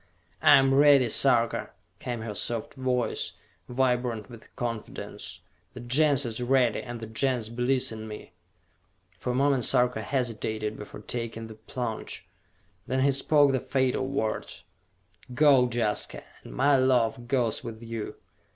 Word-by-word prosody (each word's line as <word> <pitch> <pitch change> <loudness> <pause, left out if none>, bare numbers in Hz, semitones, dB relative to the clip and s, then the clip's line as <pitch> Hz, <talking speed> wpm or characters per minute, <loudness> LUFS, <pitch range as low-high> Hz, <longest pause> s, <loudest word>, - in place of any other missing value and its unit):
"I 145 - +8
am 135 0 +3
ready, 140 -3 +6
Sarka!" 120 -1 +3 0.3
came 120 -3 -4
her 110 -1 -5
soft 115 +2 -3
voice, 130 -2 -1 0.4
vibrant 125 -3 0
with 115 -2 -14
confidence. 105 -5 -6 0.3
"The - - -7
Gens 140 +3 +2
is 115 0 -4
ready, 125 -2 +2
and 120 -1 -7
the - - -5
Gens 115 0 0
believes 125 +2 0
in 110 0 -7
me!" 105 -1 -9 0.9
For - - -4
a 125 - 0
moment 135 -1 +2
Sarka 125 -2 +2
hesitated 110 -3 -2
before 105 0 -10
taking 115 0 -5
the 110 - -9
plunge. 110 +1 -6 0.6
Then 130 +1 0
he 140 +1 +4
spoke 140 +1 +4
the 130 - +1
fatal 130 0 0
words. 135 -6 -3 0.7
"Go, 135 -3 +5
Jaska, 115 -3 -1 0.2
and - - -10
my 140 +2 +4
love 120 -2 +1
goes 120 -4 0
with 115 -1 -8
you!" 115 -2 -5
125 Hz, 140 wpm, -27 LUFS, 115-130 Hz, 0.9 s, I